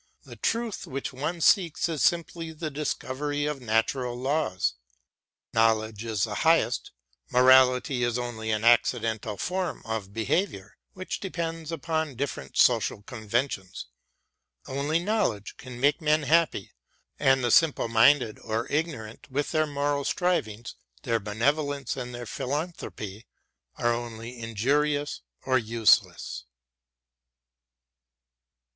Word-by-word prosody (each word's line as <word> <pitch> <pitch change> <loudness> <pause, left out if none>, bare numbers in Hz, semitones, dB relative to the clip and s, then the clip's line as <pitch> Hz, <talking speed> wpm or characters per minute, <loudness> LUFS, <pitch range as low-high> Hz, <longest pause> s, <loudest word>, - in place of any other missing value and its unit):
The - - -11
truth 230 -2 -2
which 135 0 -4
one 160 +6 -3
seeks 170 -3 +3
is 160 -4 -3
simply 170 -1 0
the 155 -1 -5
discovery 145 0 -2
of 150 -2 -3
natural 120 +2 0
laws. 130 - 0 0.8
Knowledge 110 -1 +2
is 110 -3 -1
the - - -1
highest, - - +2 0.4
morality 130 0 +5
is 120 0 +1
only 120 -2 -4
an 110 0 0
accidental 115 -2 +2
form 180 -1 -2
of 110 -4 -4
behaviour, 110 - -1 0.2
which 185 -1 -5
depends 165 -4 -4
upon 160 -2 -2
different 140 +3 -4
social 110 -4 +3
conventions. 110 - -3 0.8
Only 140 +4 0
knowledge 175 - -1
can 125 -1 -9
make 145 +6 +3
men 155 0 +2
happy, 155 - +2 0.5
and 135 -1 +3
the 120 - +1
simple 160 -4 +4
minded 115 0 +4
or 110 +2 -2
ignorant 145 -8 -3
with 140 +2 -2
their 155 -1 +2
moral 145 0 -1
strivings, 120 - -1 0.3
their 115 -1 +1
benevolence 140 +6 -1
and 125 -2 -5
their 120 0 -6
philanthropy 125 - -5 0.5
are 120 0 +1
only 120 0 -6
injurious 145 +7 0 0.2
or 130 -1 +2
useless. 110 - +2
130 Hz, 115 wpm, -27 LUFS, 115-150 Hz, 0.8 s, morality